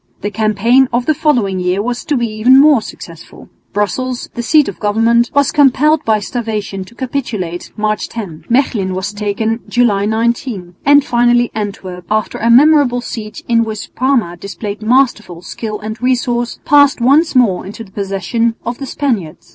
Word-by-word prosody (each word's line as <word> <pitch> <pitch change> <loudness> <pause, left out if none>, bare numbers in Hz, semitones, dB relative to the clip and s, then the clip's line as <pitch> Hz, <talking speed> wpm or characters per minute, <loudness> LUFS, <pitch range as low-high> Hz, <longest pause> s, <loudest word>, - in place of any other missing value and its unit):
The 205 - -3
campaign 220 +5 +2
of 240 +1 0
the 310 - +2
following 240 -11 0
year 180 +1 0
was 240 +3 -3
to 295 - 0
be 240 - 0
even 230 +4 +4
more 290 -4 +5
successful. 165 -5 -12 0.2
Brussels, 245 +5 -2
the 240 - -4
seat 300 +5 +3
of 200 - -6
government, 230 +3 +2
was 285 -1 +3
compelled 300 +2 +3
by 220 -1 +2
starvation 210 -3 -4
to 235 - -17
capitulate, 230 -10 -4
March 215 0 -1
10; 195 -9 -8
Mechlin 225 -7 0
was 190 +3 -4
taken, 210 +2 -2
July 210 -5 +2
19; 220 -4 -2
and 285 0 +6
finally 240 0 +2
Antwerp, 190 -4 -6
after 215 0 -1
a 230 - 0
memorable 270 -1 +5
siege, 215 -3 -7
in 230 -1 +3
which 215 -2 -6
Parma 250 -10 0
displayed 200 +3 -7
masterly 215 -7 +1
skill 215 +3 -6
and 220 +2 -7
resource, 245 -1 -1
passed 285 -2 +4
once 280 +6 +3
more 225 -8 +3
into 205 +4 -8
the 195 - -17
possession 205 +4 -2
of 240 +1 -4
the 275 - -6
Spaniards. 230 - -3
230 Hz, 165 wpm, -15 LUFS, 205-250 Hz, 0.2 s, and